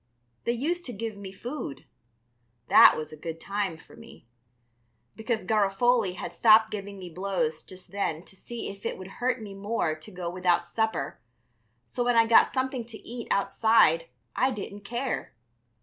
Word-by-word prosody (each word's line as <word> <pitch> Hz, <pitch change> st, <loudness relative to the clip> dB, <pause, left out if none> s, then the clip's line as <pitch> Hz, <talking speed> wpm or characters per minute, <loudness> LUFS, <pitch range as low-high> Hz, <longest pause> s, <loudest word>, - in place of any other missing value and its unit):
They 235 Hz, -, +2 dB
used 330 Hz, +9 st, -1 dB
to 245 Hz, -, -4 dB
give 225 Hz, +1 st, -4 dB
me 200 Hz, -1 st, -8 dB
food. 235 Hz, -, -6 dB, 0.8 s
That -, -, +8 dB
was 155 Hz, -1 st, -5 dB
a -, -, -8 dB
good 165 Hz, +1 st, -6 dB
time 200 Hz, -3 st, -2 dB
for -, -, -17 dB
me, -, -, -15 dB, 0.9 s
because 220 Hz, 0 st, -2 dB
Garofoli 215 Hz, 0 st, +2 dB
had -, -, -6 dB
stopped 220 Hz, -1 st, +6 dB
giving 200 Hz, -1 st, -6 dB
me 185 Hz, -2 st, -8 dB
blows 175 Hz, -3 st, -2 dB
just 185 Hz, -1 st, -12 dB
then 180 Hz, -5 st, -2 dB
to -, -, -16 dB
see 235 Hz, +5 st, -6 dB
if 200 Hz, 0 st, -14 dB
it -, -, -3 dB
would 190 Hz, +5 st, -11 dB
hurt 250 Hz, 0 st, +1 dB
me 200 Hz, -2 st, -8 dB
more 195 Hz, -4 st, -1 dB
to 155 Hz, +6 st, -10 dB
go 180 Hz, -2 st, -5 dB
without 175 Hz, -1 st, +1 dB
supper, 220 Hz, -7 st, -2 dB, 0.7 s
so 245 Hz, -, -2 dB
when 245 Hz, 0 st, +2 dB
I 230 Hz, 0 st, +6 dB
got 225 Hz, 0 st, +6 dB
something 260 Hz, -2 st, -1 dB
to 225 Hz, -1 st, -9 dB
eat 235 Hz, 0 st, -6 dB
outside 200 Hz, -5 st, +3 dB, 0.3 s
I 260 Hz, -, +3 dB
didn't 205 Hz, -3 st, -6 dB
care. 240 Hz, -, -3 dB
200 Hz, 170 wpm, -27 LUFS, 180-235 Hz, 0.9 s, That